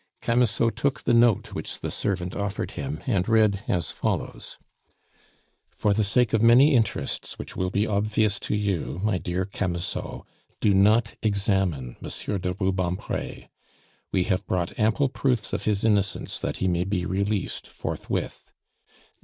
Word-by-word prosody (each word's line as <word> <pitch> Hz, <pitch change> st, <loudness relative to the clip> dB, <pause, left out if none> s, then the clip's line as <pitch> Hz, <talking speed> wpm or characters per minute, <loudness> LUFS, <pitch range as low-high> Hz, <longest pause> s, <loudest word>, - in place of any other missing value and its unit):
Camusot 115 Hz, -1 st, +2 dB
took 140 Hz, -2 st, -1 dB
a -, -, +4 dB
note 115 Hz, -2 st, +4 dB
which 80 Hz, -, -4 dB
the -, -, -4 dB
servant 90 Hz, -2 st, -2 dB
offered 100 Hz, 0 st, -3 dB
him, 140 Hz, +2 st, -5 dB
and 100 Hz, -7 st, +1 dB
read 110 Hz, -3 st, +4 dB
as 85 Hz, -3 st, 0 dB
follows: -, -, -3 dB, 1.1 s
"For 105 Hz, -, +1 dB
the 110 Hz, +1 st, +2 dB
sake 105 Hz, +3 st, +2 dB
of 110 Hz, -, +3 dB
many 125 Hz, +6 st, +7 dB
interests 115 Hz, -4 st, -1 dB
which -, -, -8 dB
will 90 Hz, 0 st, -1 dB
be 100 Hz, +3 st, +1 dB
obvious 105 Hz, 0 st, +1 dB
to -, -, -2 dB
you, 100 Hz, -5 st, -1 dB
my 105 Hz, -4 st, +1 dB
dear 90 Hz, +2 st, -2 dB
Camusot, 90 Hz, -3 st, -3 dB, 0.4 s
do 105 Hz, -, +3 dB
not 110 Hz, +4 st, +4 dB
examine 95 Hz, -, 0 dB
Monsieur 100 Hz, -, -3 dB
de 90 Hz, 0 st, -2 dB
Rubempre. 95 Hz, -2 st, -2 dB, 0.6 s
We 95 Hz, -, +2 dB
have 95 Hz, -1 st, -1 dB
brought 90 Hz, +2 st, -2 dB
ample 110 Hz, +6 st, +3 dB
proofs 125 Hz, -4 st, 0 dB
of -, -, -2 dB
his 105 Hz, -2 st, +1 dB
innocence 100 Hz, -3 st, +1 dB
that -, -, -3 dB
he 95 Hz, -, 0 dB
may 90 Hz, -1 st, +1 dB
be 90 Hz, -1 st, -1 dB
released 100 Hz, +2 st, -1 dB
forthwith. -, -, -4 dB
100 Hz, 150 wpm, -25 LUFS, 95-110 Hz, 1.1 s, many